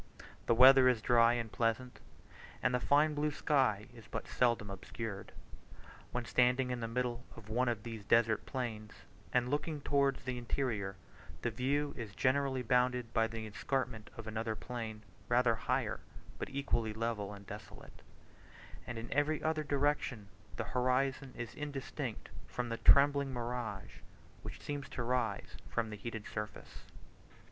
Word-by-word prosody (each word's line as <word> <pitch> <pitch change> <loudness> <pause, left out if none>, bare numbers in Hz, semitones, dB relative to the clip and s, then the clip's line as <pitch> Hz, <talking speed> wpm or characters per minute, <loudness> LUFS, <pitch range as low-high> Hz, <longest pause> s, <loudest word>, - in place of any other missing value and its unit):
The 115 - +4
weather 130 +1 +9
is 125 -3 +2
dry 115 +1 +5
and 115 -2 -2
pleasant, 120 +3 -1 0.6
and 130 - +3
the 125 - +3
fine 150 +4 +4
blue 150 +1 +1
sky 130 -8 +2
is 115 -3 -13
but - - -5
seldom 115 -5 +1
obscured. 100 +1 -6 0.8
When 125 -1 -2
standing 125 +1 +3
in 125 - -2
the 115 - -2
middle 120 +1 -2
of 110 -2 -12
one 125 +3 +2
of 110 -3 -2
these 115 -3 -6
desert 115 +1 +3
plains 110 -5 -4 0.4
and 125 +1 +2
looking 150 +1 -1
towards 140 -1 +2
the 125 -1 -3
interior, 115 -6 -2 0.5
the 120 - +1
view 140 +5 0
is 110 -6 -7
generally 130 -1 +2
bounded 125 0 +2
by 115 -1 +3
the 115 0 -5
escarpment 115 +1 -2
of 115 - -7
another 110 0 -2
plain, 110 -2 -6 0.3
rather 120 -1 +4
higher, 115 - -1 0.4
but - - -3
equally 120 -5 -1
level 110 -2 -2
and 100 -1 -10
desolate; 100 -1 -10 0.9
and 120 - -4
in 115 +1 -4
every 145 +2 +1
other 155 -1 +1
direction 140 -7 0 0.3
the - - -1
horizon 130 +2 +1
is 120 -1 -5
indistinct 145 -3 -5 0.2
from 125 -1 -3
the 115 - -2
trembling 140 +1 +5
mirage 120 -5 -4 0.4
which - - -8
seems 145 -1 -5
to 120 - -3
rise 120 -4 -1
from 115 -2 -1
the - - -4
heated 110 +1 -6
surface. 105 0 -7
120 Hz, 155 wpm, -34 LUFS, 110-135 Hz, 0.9 s, weather